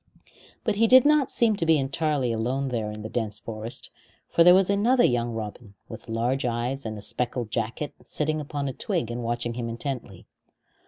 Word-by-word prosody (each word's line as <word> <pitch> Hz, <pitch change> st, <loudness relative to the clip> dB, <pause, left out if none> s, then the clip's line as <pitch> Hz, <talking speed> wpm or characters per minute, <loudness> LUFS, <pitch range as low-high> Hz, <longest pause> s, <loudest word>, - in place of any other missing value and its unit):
But 215 Hz, -4 st, 0 dB
he 230 Hz, +1 st, +4 dB
did 255 Hz, +2 st, +7 dB
not 300 Hz, -3 st, +4 dB
seem 225 Hz, -3 st, +2 dB
to -, -, -1 dB
be 160 Hz, -1 st, +5 dB
entirely 140 Hz, -2 st, 0 dB
alone 130 Hz, +5 st, -1 dB
there 115 Hz, -4 st, -2 dB
in 105 Hz, 0 st, -7 dB
the -, -, -4 dB
dense 110 Hz, -4 st, -2 dB
forest, 110 Hz, +1 st, -7 dB, 0.4 s
for 170 Hz, -, +5 dB
there 180 Hz, +1 st, +8 dB
was 190 Hz, -1 st, +4 dB
another 230 Hz, +6 st, +3 dB
young 120 Hz, -1 st, +1 dB
robin, 110 Hz, -1 st, -7 dB
with -, -, -10 dB
large 120 Hz, +4 st, 0 dB
eyes 120 Hz, +2 st, -2 dB
and 110 Hz, -1 st, -5 dB
a -, -, -8 dB
speckled 120 Hz, -2 st, -2 dB
jacket, 115 Hz, +6 st, -3 dB
sitting 155 Hz, 0 st, -1 dB
upon 145 Hz, -1 st, -4 dB
a 135 Hz, -, -3 dB
twig 120 Hz, -1 st, -2 dB
and 120 Hz, +1 st, -4 dB
watching 120 Hz, 0 st, -2 dB
him 115 Hz, -1 st, -4 dB
intently. 115 Hz, -5 st, -5 dB
125 Hz, 195 wpm, -26 LUFS, 115-155 Hz, 0.4 s, there